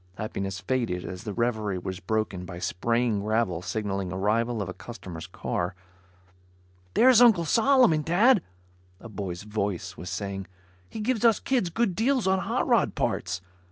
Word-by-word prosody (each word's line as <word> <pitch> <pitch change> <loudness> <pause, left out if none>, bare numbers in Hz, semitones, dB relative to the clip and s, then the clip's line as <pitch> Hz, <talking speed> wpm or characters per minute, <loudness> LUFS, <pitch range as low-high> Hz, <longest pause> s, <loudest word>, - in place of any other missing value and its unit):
Happiness 95 -3 -4
faded 105 -4 -1
as 90 +3 -7
the 105 - -3
reverie 110 -5 0
was 95 +1 -5
broken 105 -2 -2
by 90 -1 -8
spraying 115 +5 0
gravel 105 -4 0
signaling 95 0 -3
arrival 110 +5 0
of 100 - -2
a 90 - -5
customer's 95 -6 -9
car. 90 +1 -3 1.2
"There's 250 -1 +7
Uncle 215 -9 +6
Solomon, 230 - +4
Dad," 200 - +4 0.6
a 115 - -10
boy's 95 -4 -5
voice 100 -4 -3
was 90 - -7
saying. 100 -2 -4 0.4
"He 220 - -6
gives 235 0 0
us 230 -3 +5
kids 245 -9 0
good 225 +2 0
deals 250 +2 +1
on 190 0 +3
hot 190 - -1
rod - - +2
parts. 90 +1 -1
110 Hz, 155 wpm, -27 LUFS, -, 1.2 s, There's